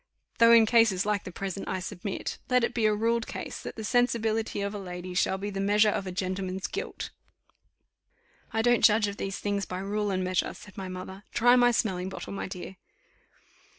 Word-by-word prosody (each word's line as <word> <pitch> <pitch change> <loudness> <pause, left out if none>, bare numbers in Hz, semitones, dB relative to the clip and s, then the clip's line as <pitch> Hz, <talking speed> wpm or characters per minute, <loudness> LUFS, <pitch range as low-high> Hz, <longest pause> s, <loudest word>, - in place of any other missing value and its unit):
though 230 0 +7
in 230 -1 +8
cases 220 -5 +4
like 210 -2 0
the 185 - -6
present 195 +1 -5
I 190 - -2
submit. 190 +1 -5
Let 250 -1 +3
it 235 - 0
be 225 -3 +2
a 210 - +2
ruled 230 +2 0
case, - - -6
that - - -7
the 220 - -6
sensibility 225 -2 +1
of 200 +1 -2
a 205 - -4
lady 180 -1 -6
shall 190 +1 +1
be 205 +2 -4
the 195 - -4
measure 210 +2 +4
of 195 - -3
a - - -3
gentleman's 185 0 -3
guilt." 410 - -5 1.4
"I 225 - 0
don't 240 0 +3
judge 210 -1 +5
of 200 0 -5
these 195 0 -3
things 200 -1 -1
by 180 - -4
rule 205 +2 -2
and 185 -1 0
measure," 185 0 0
said 205 - -13
my 190 -1 -5
mother: 185 +1 -7
"try 245 +1 +6
my 245 -1 +5
smelling 190 -6 0
bottle, 190 - -7
my 200 - -4
dear." 185 0 -8
200 Hz, 205 wpm, -28 LUFS, 190-225 Hz, 1.4 s, in